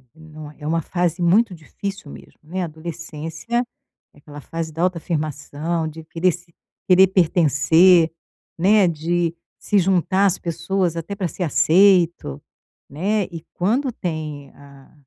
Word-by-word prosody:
não 155 -1 -11
é - - -22
é 150 - -6
uma 165 +1 +1
fase 175 +1 -2
muito 190 +4 +3
difícil 195 +1 -7
mesmo, - - -14
né, 180 +5 -4
adolescência 165 +7 -4 0.5
é - - -23
aquela 145 0 -11
fase 165 +2 -5
da 165 - -4
autoafirmação, 160 -2 -2
de 160 +1 -9
querer 170 +3 +1
se 170 0 -12 0.4
querer 190 +1 +7
pertencer, 170 -1 +4 0.5
né, 200 +2 +5
de 170 +1 -1 0.2
se 205 - +1
juntar 190 +1 +2
às 190 - 0
pessoas, 170 +1 -2
até 170 +4 -5
para 195 -3 -2
ser 175 +3 -5
aceito, 170 - +3 0.5
né, 200 +9 0
e 165 -2 -8
quando 245 +9 0
tem 155 - -5
a 140 -1 -17
170 Hz, 140 wpm, -21 LUFS, 155-185 Hz, 0.5 s, querer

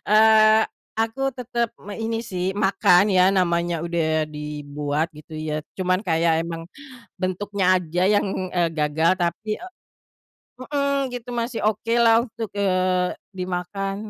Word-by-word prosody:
Eee, 215 +1 +6 0.4
aku 235 +5 0
tetep 240 -2 -2 0.2
me 205 - -6
ini 225 0 -2
sih 180 0 -1
makan 195 -2 +4
ya 185 - +6
namanya 175 -3 +1
udah 160 -2 0
dibuat 150 0 -3
gitu 155 - -14
ya 155 0 -3 0.2
cuman 185 0 +1
kayak 165 -3 +2
emang, 165 0 -5 0.6
bentuknya 190 +1 -1 0.2
aja 175 +1 -2
yang, 205 - +2 0.3
eee, 175 -2 +2
gagal 150 +2 +2
tapi, 175 +4 -2
e - - -7 1.0
mhm, 280 0 -1
gitu 245 0 -7
masih 235 0 -2
oke 220 +2 -1
lah 230 0 +6
untuk, 225 -2 -6
eee, 185 -2 +1 0.3
dimakan 185 +2 -3
185 Hz, 130 wpm, -23 LUFS, 170-220 Hz, 1.0 s, Eee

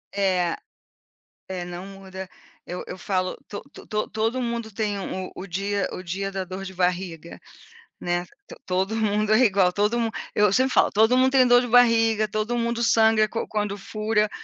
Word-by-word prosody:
É. 185 -4 +1 0.9
É, 180 -2 -4
não 175 +1 -7
muda. 190 -1 -9 0.4
Eu 180 +1 -5
eu 185 - -7
falo: 185 -1 -1
"To 205 - -6
to - - -13
to 215 -1 -2
todo 225 +4 -1
mundo 235 -1 -3
tem 205 -1 -2
o 190 -1 -5
o 195 - -7
dia 200 +2 -1
o 185 - -6
dia 195 +2 -4
da 195 -1 -2
dor 185 +1 -7
de 190 -1 -8
barriga", 180 -2 -2 0.6
né. 175 0 -1 0.2
To - - -11
todo 190 +4 -1
mundo 215 0 +1
é - - +5
igual. 190 -4 +4
Todo 210 +5 +1
mun 230 - +1 0.3
eu 210 -1 +4
sempre 260 +6 +2
falo: - - +4
"Todo 220 +4 +4
mundo 260 0 +4
tem 260 -2 +5
dor 245 0 +6
de 245 - -2
barriga. 225 -2 +4
Todo 215 +3 -2
mundo 235 0 -1
sangra 220 -2 +4
quan 230 - -3
quando 205 -1 -2
fura 215 +1 -1
205 Hz, 185 wpm, -24 LUFS, 190-225 Hz, 0.9 s, dor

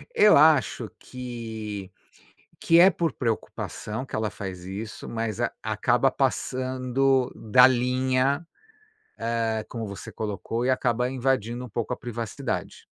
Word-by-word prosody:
eu 210 0 +7
acho 150 -2 +4
que 110 -6 -6 0.7
que 165 0 +5
é 185 +3 +8
por 165 -6 -1
preocupação 115 0 -3
que - - -10
ela 110 -1 -1
faz 95 -3 -7
isso 105 +4 -7
mas 115 -3 -3
a - - 0
acaba - - +2
passando 130 0 0
da 125 +3 +6
linha, 130 +3 +1 0.8
hã, 115 -1 -1
como 115 -2 -5
você 100 -3 -8
colocou, 110 +3 -3
e - - +1
acaba 125 -1 +1
invadindo 125 -2 -1
um - - -11
pouco 110 +1 -2
a - - -5
privacidade. 115 -3 -5
120 Hz, 130 wpm, -26 LUFS, 110-130 Hz, 0.8 s, é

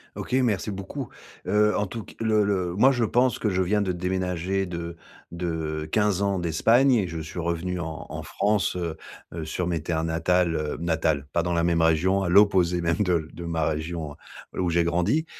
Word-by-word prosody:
OK, - - -6
merci 115 -6 +1
beaucoup, 100 +8 -5 0.4
heu, 105 0 +3
en 105 -1 0
tout 110 +2 -7
c - - -14
le 110 -2 +2
le 95 -3 -1
moi, 130 +6 +6
je 120 -3 0
pense 125 +2 +2
que 105 - 0
je 95 0 +1
viens 105 +3 +1
de 95 -2 0
déménager 90 +1 -1
de 85 -1 -5 0.4
de 80 -3 -3
15 105 -3 +2
ans 100 -1 +1
d'Espagne 115 - +3
et 100 -6 +2
je 85 0 -6
suis 80 +3 -6
revenu 85 +2 -2
en 80 -1 -5
en - - -5
France, 100 -2 0
heu 85 -3 -3 0.4
heu, 80 -2 -4
sur 85 +3 -3
mes 85 -3 -1
terres 80 0 -1
natales, 85 +1 +1
heu, 75 -1 -2
natales, 80 -4 0
pas 85 - +2
dans 85 +1 -1
la 85 0 +1
même 85 -1 +2
région, 85 +5 +3
à 90 - -1
l'opposé 90 -3 +4
même 85 +2 +1
de 85 -5 +1
de 85 - -8
ma 80 -2 -1
région, 80 0 -3 0.4
heu, - - -1
où 90 - +1
j'ai 85 0 +2
grandi 90 - +1
90 Hz, 205 wpm, -25 LUFS, 85-100 Hz, 0.4 s, moi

